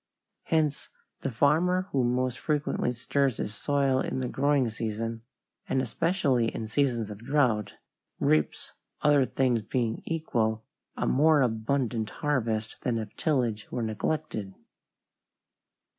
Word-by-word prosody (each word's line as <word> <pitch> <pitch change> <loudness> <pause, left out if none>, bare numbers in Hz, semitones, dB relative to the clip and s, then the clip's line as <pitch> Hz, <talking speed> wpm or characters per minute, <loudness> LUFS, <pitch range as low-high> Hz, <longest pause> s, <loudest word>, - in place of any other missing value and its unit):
Hence 155 -3 0 0.3
the - - -2
farmer 160 +9 +3
who 135 -2 +2
most 125 +1 0
frequently 150 -5 0
stirs 130 +1 0
his 105 - -3
soil 140 +1 +1
in - - -2
the 130 - -1
growing 140 0 +2
season, 115 +1 -3 0.5
and 135 - +2
especially 135 - +1
in 115 -1 -4
seasons 115 -3 0
of 100 - -8
drought, 120 -4 +1 0.4
reaps, 75 0 +1 0.3
other 145 -3 +5
things 125 -4 +1
being 115 +1 -1
equal, 115 -9 -1 0.3
a - - 0
more 150 +1 +4
abundant 115 -1 0
harvest 115 -7 -1
than 120 -2 0
if 110 -2 -6
tillage 120 -8 0
were 120 - -2
neglected. 110 -3 -2
125 Hz, 125 wpm, -28 LUFS, 110-140 Hz, 0.5 s, other